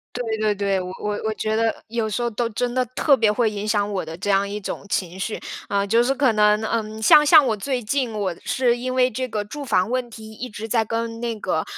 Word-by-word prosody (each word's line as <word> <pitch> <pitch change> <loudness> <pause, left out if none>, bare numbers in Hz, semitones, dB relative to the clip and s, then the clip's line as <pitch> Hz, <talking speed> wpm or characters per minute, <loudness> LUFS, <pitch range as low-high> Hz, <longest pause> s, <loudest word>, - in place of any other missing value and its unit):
对 225 -3 -2
对 210 -1 +1
对， 195 -1 0
我 180 - -6
我 210 0 -2
我 220 - 0
觉 215 0 -1
得 225 0 0
有 225 -1 -2
时 240 - -2
候 240 - 0
都 235 +1 -2
真 240 +3 -2
的 255 0 +2
特 285 -3 +4
别 220 -4 +3
会 225 0 +1
影 210 0 -4
响 210 -1 +1
我 185 - -1
的 160 +1 -8
这 190 - -4
样 195 +1 +2
一 210 +1 -4
种 195 - -6
情 185 -1 -2
绪。 215 +3 -3 0.3
呃， 200 0 +1
就 230 +4 +3
是 270 - +1
可 265 -4 +3
能， 210 0 +4
嗯， 220 -1 -2
像 295 +7 +7
像 300 -1 +7
我 225 -4 +1
最 250 +3 -3
近， 250 +1 -1
我 200 -4 -2
是 245 -2 +1
因 255 +1 -3
为 255 0 +3
这 255 +3 -3
个 215 -3 -3
住 285 +8 -7
房 220 -5 +1
问 255 -1 -1
题， 220 -1 -11
一 250 +4 -7
直 215 +1 -7
在 225 0 +2
跟 230 +1 -3
那 230 -2 -3
个， 160 -5 -1
220 Hz, 275 characters per minute, -22 LUFS, 210-245 Hz, 0.3 s, 像